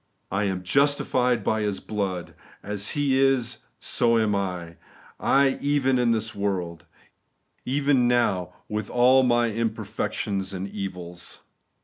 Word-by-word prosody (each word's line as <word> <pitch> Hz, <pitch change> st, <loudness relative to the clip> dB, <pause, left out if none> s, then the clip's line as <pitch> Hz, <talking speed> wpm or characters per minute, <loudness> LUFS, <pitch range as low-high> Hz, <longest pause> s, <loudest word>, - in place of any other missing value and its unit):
I 100 Hz, +2 st, 0 dB
am 95 Hz, -2 st, -2 dB
JUSTIFIED 125 Hz, -1 st, +2 dB
BY 110 Hz, +2 st, 0 dB
His 105 Hz, -2 st, -1 dB
BLOOD. 95 Hz, -4 st, -4 dB, 0.2 s
' -, -, -25 dB
As 100 Hz, 0 st, -2 dB
He 135 Hz, -2 st, +2 dB
is, 125 Hz, -4 st, +2 dB, 0.2 s
SO 115 Hz, -1 st, +2 dB
am 110 Hz, -2 st, +2 dB
I 90 Hz, -4 st, -4 dB, 0.8 s
(even) 135 Hz, -3 st, +1 dB
in 120 Hz, -1 st, +2 dB
this 110 Hz, -1 st, 0 dB
world,' 90 Hz, -4 st, -3 dB, 0.5 s
— -, -, -46 dB
even 135 Hz, -2 st, +2 dB
now, 105 Hz, -7 st, +1 dB, 0.2 s
with 105 Hz, -1 st, -3 dB
all 125 Hz, +2 st, +5 dB
my 120 Hz, -2 st, +2 dB
imperfections 100 Hz, -3 st, -2 dB
and 95 Hz, +1 st, -4 dB
evils. 90 Hz, -3 st, -7 dB
110 Hz, 130 wpm, -25 LUFS, 95-125 Hz, 0.8 s, all